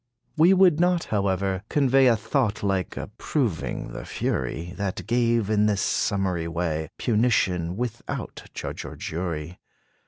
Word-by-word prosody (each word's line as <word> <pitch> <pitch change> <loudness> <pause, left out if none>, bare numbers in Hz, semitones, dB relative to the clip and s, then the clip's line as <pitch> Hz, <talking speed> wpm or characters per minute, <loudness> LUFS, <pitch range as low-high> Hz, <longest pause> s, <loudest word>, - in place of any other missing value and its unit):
We 170 +5 +6
would 180 -4 +5
not, 175 -1 +3
however, 95 -1 0
convey 135 -2 +4
A 120 - +5
thought 110 0 -1
like 95 -4 -1
approving 115 - -2
the - - -6
fury, 85 +3 -3
That 100 -2 -3
gave, 115 -1 +2
in 105 0 +3
this 100 -3 +1
summary 95 -4 0
way, 80 -2 -2
Punition, 105 -7 +1
without 120 -1 -5
judge - - -5
or - - -8
jury. 85 0 -4
105 Hz, 130 wpm, -25 LUFS, 90-125 Hz, -, We